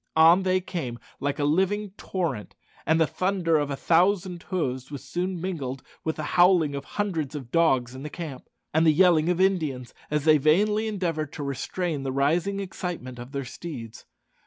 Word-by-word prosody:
On 165 +4 +7
they 185 0 +1
came 155 -10 -4 0.2
like 140 0 -1
a 145 - -1
living 190 +7 +1
torrent, 170 - -4 0.3
and 160 +1 +4
the 160 - +5
thunder 180 0 +1
of 145 -1 -1
a 140 - -2
thousand 180 +3 +2
hoofs 130 -9 -3
was 145 -2 -7
soon 180 +1 -3
mingled 140 -8 -4 0.2
with 160 - -1
the 155 - -4
howling 175 -3 +4
of 140 0 -5
hundreds 165 -9 -1
of 130 -5 -7
dogs 130 -7 +2
in 130 - -8
the 150 - -5
camp, 150 -6 -7 0.2
and 160 +1 +4
the - - +8
yelling 170 -1 +4
of 180 0 +1
Indians, 155 -10 0 0.2
as 150 -1 -1
they 155 -1 +6
vainly 210 +9 +3
endeavoured 165 -8 -2
to 145 - -5
restrain 145 +3 -2
the 135 -1 -2
rising 165 +9 +1
excitement 180 -10 -5
of 120 +2 -9
their 140 -2 -3
steeds. 125 -5 -8
160 Hz, 185 wpm, -26 LUFS, 140-185 Hz, 0.3 s, the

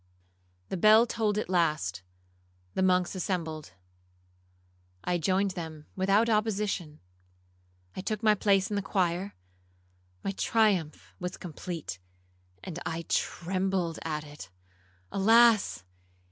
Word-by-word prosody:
The - - -2
bell 215 +5 +7
tolled 220 -3 -1
at 215 - -1
last,—the 90 - -3
monks 180 -1 +2
assembled. 165 - -3 1.3
I 175 -1 0
joined 190 +4 +1
them 160 -4 -7
without 195 +4 +3
opposition,—I 90 - -4
took 215 +2 -3
my 215 -1 +6
place 195 -1 +2
in - - 0
the 200 - 0
choir,—my 90 - -5
triumph 200 -6 0
was 180 0 -4
complete, 165 - -6 0.6
and 175 -2 -6
I 165 +1 -3
trembled 185 -1 -1
at 155 -2 -3
it. 145 -11 -11 0.6
Alas! 225 - +4
175 Hz, 100 wpm, -29 LUFS, -, 1.3 s, bell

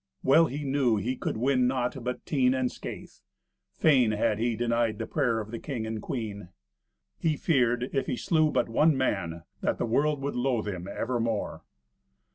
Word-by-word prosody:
Well 160 +5 +5
he 145 +2 -5
knew 135 -5 +2
he 120 +6 -1
could - - -3
win 125 +1 +2
naught 125 0 -1
but 125 +1 -4
teen 130 -3 +2
and 130 -1 0
scathe. - - -8 0.6
Fain 130 - +4
had 105 0 +1
he 115 0 0
denied 115 -1 0
the - - -3
prayer 115 -3 0
of 110 0 -6
the 115 - -5
king 125 -6 -4
and 110 -1 -4
queen. 105 -7 -5 0.7
He 155 -2 +1
feared, 125 -5 +2
if 135 - 0
he 125 - -1
slew 155 +2 +2
but - - +1
one 150 +6 +3
man, 85 -10 -1 0.2
that - - 0
the - - -1
world 145 +5 +1
would 140 - -2
loathe 125 -3 0
him 95 -3 -4
evermore. 115 0 -2
125 Hz, 180 wpm, -28 LUFS, 110-135 Hz, 0.7 s, Well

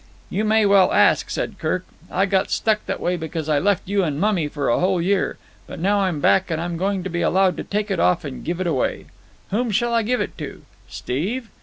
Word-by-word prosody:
"You 210 +3 0
may 215 0 +3
well 200 -2 +5
ask," - - +4
said - - -3
Kirk. 185 0 -1 0.2
"I 190 +2 +1
got 195 -1 +1
struck 215 -1 +1
that - - -2
way 180 +1 -1
because 160 -1 -5
I 150 -2 +2
left 200 +2 +1
you 200 0 +1
and 150 -4 -2
mummy 190 -5 +1
for 145 -1 -3
a 120 - +2
whole 185 0 +2
year. 190 +3 0 0.3
But - - -8
now 200 +4 +2
I'm 185 -6 0
back 190 +6 +3
I'm 170 +2 -2
going 190 +2 -1
to 190 - -4
be 170 - -1
allowed 190 0 +3
to - - -4
take 210 0 -2
it 190 - 0
off 175 -2 +2
and 135 -3 -7
give 175 +1 -3
it 185 - -1
away. 160 -7 -1 0.5
Whom 235 +4 0
shall 235 +3 +1
I 230 - +3
give 245 +3 0
it - - -3
to? - - -7 0.3
Steve? 215 - -3
190 Hz, 230 wpm, -22 LUFS, 170-205 Hz, 0.5 s, well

